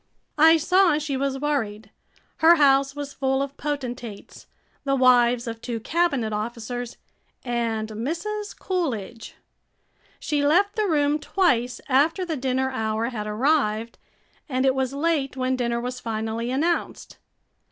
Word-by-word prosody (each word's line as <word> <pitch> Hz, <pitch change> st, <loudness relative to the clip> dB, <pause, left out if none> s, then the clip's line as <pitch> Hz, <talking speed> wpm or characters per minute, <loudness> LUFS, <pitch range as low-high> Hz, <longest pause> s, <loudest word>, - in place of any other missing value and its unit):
I 320 Hz, +2 st, +7 dB
saw 360 Hz, 0 st, +3 dB
she 300 Hz, -2 st, -3 dB
was 270 Hz, 0 st, -1 dB
worried. 220 Hz, -8 st, -2 dB, 0.5 s
Her 330 Hz, +2 st, +7 dB
house 275 Hz, -2 st, +3 dB
was 285 Hz, -1 st, -6 dB
full 265 Hz, 0 st, 0 dB
of 280 Hz, 0 st, -7 dB
potentates, 250 Hz, -7 st, -6 dB, 0.4 s
the 275 Hz, -1 st, +1 dB
wives 245 Hz, -2 st, +4 dB
of 230 Hz, -1 st, -6 dB
two 235 Hz, -2 st, -4 dB
cabinet 275 Hz, -4 st, 0 dB
officers, 235 Hz, +2 st, -5 dB, 0.5 s
and 230 Hz, -3 st, -1 dB
Mrs. 340 Hz, -, -4 dB
Coolidge. 240 Hz, -, -3 dB, 0.8 s
She 295 Hz, -2 st, -1 dB
left 390 Hz, +8 st, +3 dB
the 430 Hz, -1 st, +1 dB
room 295 Hz, -2 st, +2 dB
twice 255 Hz, -9 st, +1 dB
after 305 Hz, +8 st, +2 dB
the 330 Hz, -3 st, -3 dB
dinner 265 Hz, 0 st, -1 dB
hour 220 Hz, -1 st, -1 dB
had 215 Hz, -4 st, -5 dB
arrived, 230 Hz, -1 st, 0 dB, 0.5 s
and 260 Hz, 0 st, 0 dB
it 265 Hz, -, +4 dB
was 265 Hz, -1 st, -1 dB
late 280 Hz, -2 st, -1 dB
when 260 Hz, 0 st, 0 dB
dinner 235 Hz, -2 st, -1 dB
was 250 Hz, +1 st, -4 dB
finally 225 Hz, +1 st, -3 dB
announced. 315 Hz, +7 st, -2 dB
265 Hz, 135 wpm, -24 LUFS, 235-300 Hz, 0.8 s, I